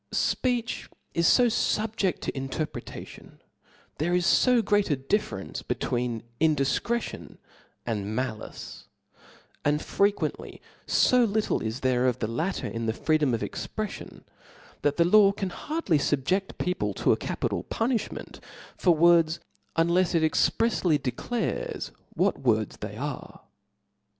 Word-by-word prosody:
Speech 245 Hz, -2 st, 0 dB, 0.2 s
is 170 Hz, 0 st, +2 dB
fb, 245 Hz, -1 st, +5 dB
fubjedl 215 Hz, -4 st, 0 dB
to -, -, -3 dB
interpretation 135 Hz, +3 st, -6 dB
•, -, -, -38 dB, 0.5 s
there 175 Hz, +4 st, +1 dB
is 180 Hz, 0 st, +4 dB
fo 250 Hz, -3 st, +4 dB
great 205 Hz, 0 st, +2 dB
a 145 Hz, -, +3 dB
diffe, 135 Hz, +11 st, 0 dB
rence 95 Hz, -, -6 dB
between 120 Hz, -2 st, -2 dB, 0.2 s
indifcretion 160 Hz, -, 0 dB, 0.5 s
and 110 Hz, -2 st, -2 dB
malice; 125 Hz, -4 st, -5 dB, 0.8 s
and 145 Hz, +1 st, +2 dB
fre 200 Hz, -, +3 dB
quently 205 Hz, -, -4 dB, 0.3 s
fo 250 Hz, -1 st, +4 dB
little 220 Hz, -1 st, 0 dB
is 115 Hz, +3 st, -3 dB
there 130 Hz, -1 st, +2 dB
of 125 Hz, -1 st, +1 dB
the 115 Hz, -, -2 dB
latter 125 Hz, -, -2 dB
in 115 Hz, 0 st, -3 dB
the 110 Hz, -, +1 dB
free 155 Hz, +6 st, +1 dB
dom 135 Hz, -6 st, +2 dB
of 115 Hz, -, -5 dB
expreflion, -, -, -5 dB, 0.6 s
that 145 Hz, 0 st, +1 dB
the 170 Hz, -, +5 dB
law 200 Hz, +2 st, +6 dB
can 195 Hz, -2 st, -4 dB
hardly 295 Hz, -, -1 dB
lbbje<fl 165 Hz, +8 st, 0 dB
people 105 Hz, -, -1 dB
to -, -, +2 dB
a -, -, +5 dB
capital -, -, -2 dB
punifliment 230 Hz, 0 st, -2 dB, 0.4 s
for 175 Hz, -3 st, +3 dB
words, 170 Hz, 0 st, +4 dB, 0.4 s
unlefs 170 Hz, +2 st, +3 dB
it 165 Hz, -, +3 dB
exprefsly 175 Hz, 0 st, +2 dB
declares 245 Hz, -, -3 dB, 0.2 s
what -, -, +1 dB
words -, -, +1 dB
they -, -, -7 dB
arc -, -, -5 dB
*. -, -, -39 dB
170 Hz, 140 wpm, -27 LUFS, 130-205 Hz, 0.8 s, law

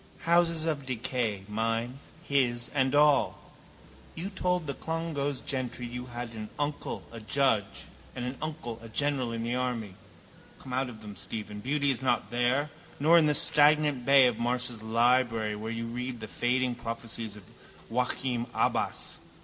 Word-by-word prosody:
Houses 170 Hz, -1 st, +3 dB
of 145 Hz, -4 st, -2 dB
decay, 120 Hz, -5 st, -1 dB
mine, 115 Hz, +4 st, -1 dB, 0.2 s
his 125 Hz, -6 st, 0 dB
and 135 Hz, -1 st, +2 dB
all. 145 Hz, -1 st, +4 dB, 0.8 s
You 185 Hz, +5 st, -4 dB
told 180 Hz, -3 st, 0 dB
the 140 Hz, -, -2 dB
Clongowes 155 Hz, -3 st, -3 dB
gentry 130 Hz, -2 st, -2 dB
you 125 Hz, +1 st, -6 dB
had 120 Hz, -1 st, -6 dB
an 110 Hz, -1 st, -6 dB
uncle 145 Hz, 0 st, -3 dB
a 115 Hz, -, -8 dB
judge 110 Hz, -2 st, 0 dB, 0.3 s
and 125 Hz, -, -3 dB
an 125 Hz, +2 st, -3 dB
uncle 150 Hz, -7 st, -5 dB
a 115 Hz, -, -10 dB
general 135 Hz, 0 st, +1 dB
in 115 Hz, 0 st, -3 dB
the 120 Hz, +1 st, -1 dB
army. 125 Hz, -5 st, -2 dB, 0.6 s
Come 130 Hz, -, -9 dB
out 130 Hz, 0 st, 0 dB
of 110 Hz, -3 st, -11 dB
them, 105 Hz, -1 st, -8 dB
Stephen. 105 Hz, -1 st, -6 dB
Beauty 140 Hz, +4 st, +1 dB
is 130 Hz, -, -3 dB
not 125 Hz, -2 st, 0 dB
there. 125 Hz, +5 st, +1 dB, 0.3 s
Nor 165 Hz, +4 st, +6 dB
in 155 Hz, -, +4 dB
the 150 Hz, -, +4 dB
stagnant 150 Hz, -2 st, +5 dB
bay 135 Hz, 0 st, +7 dB
of 120 Hz, -3 st, +1 dB
Marsh's 120 Hz, -1 st, -1 dB
library 115 Hz, -1 st, +2 dB
where 110 Hz, +2 st, -5 dB
you 115 Hz, 0 st, -3 dB
read 125 Hz, +1 st, -4 dB
the 110 Hz, -, -6 dB
fading 125 Hz, +7 st, 0 dB
prophecies 115 Hz, -2 st, -5 dB
of 105 Hz, -, -12 dB, 0.5 s
Joachim 125 Hz, 0 st, 0 dB
Abbas. -, -, 0 dB
125 Hz, 160 wpm, -29 LUFS, 115-140 Hz, 0.8 s, bay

